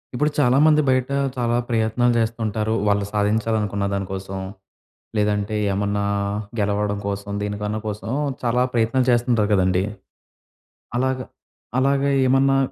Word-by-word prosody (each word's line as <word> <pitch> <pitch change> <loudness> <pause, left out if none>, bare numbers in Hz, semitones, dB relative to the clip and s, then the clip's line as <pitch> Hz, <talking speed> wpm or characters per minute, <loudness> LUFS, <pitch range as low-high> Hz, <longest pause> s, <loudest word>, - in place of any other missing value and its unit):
ఇప్పుడు 150 +3 +1
చాలామంది 150 +3 +5
బయట, 130 0 +2 0.3
చాలా 120 -1 0
ప్రయత్నాలు 115 +1 +2
జేస్తుంటారు. 110 -1 -1
వాళ్ళు 100 0 +2
సాధించాలనుకున్న 105 -1 0
దాని 100 0 -1
కోసం. 95 0 -5 0.8
లేదంటే 105 0 0 0.2
ఏమన్నా 100 +1 -1 0.6
గెలవడం 105 0 0
కోసం, 100 0 -4
దీనికన్నా 105 +1 -3
కోసం 105 +1 -5 0.3
చాలా 125 +1 +2
ప్రయత్నాలు 120 +2 +2
చేస్తుంటారు 120 -3 +2
కదండీ! 95 -1 +2 1.1
అలాగ, 130 +1 +1 0.6
అలాగ 140 +1 +2 0.2
ఏమన్నా 135 +1 +4
110 Hz, 110 wpm, -22 LUFS, 100-125 Hz, 1.1 s, చాలామంది